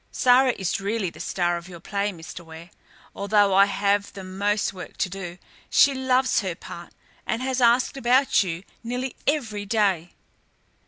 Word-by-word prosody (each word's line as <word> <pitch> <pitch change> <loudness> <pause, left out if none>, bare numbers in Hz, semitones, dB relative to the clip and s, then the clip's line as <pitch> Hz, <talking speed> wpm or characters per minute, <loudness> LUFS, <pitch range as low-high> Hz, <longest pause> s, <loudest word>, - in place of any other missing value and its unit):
Sara 255 0 +4
is 190 +1 -2
really 200 -2 -1
the - - -15
star 175 -1 0
of 170 +1 -10
your 175 -2 -10
play, 200 +3 -2
Mr. 170 0 -10
Ware, 165 +1 -12 0.4
although 200 0 +3
I 195 +1 +7
have 200 +1 0
the 195 - -8
most 200 +2 -1
work 185 -2 -10
to 185 - 0
do. 180 -2 -7 0.3
She 280 - +5
loves 260 -1 +2
her 190 -6 -3
part 170 0 -10 0.4
and 235 +2 -1
has 260 -1 -1
asked 245 +3 +3
about 260 +1 +3
you 175 -2 -3 0.2
nearly 250 +2 -3
every 220 -9 -1
day." 195 -6 +1
200 Hz, 165 wpm, -24 LUFS, 180-245 Hz, 0.4 s, I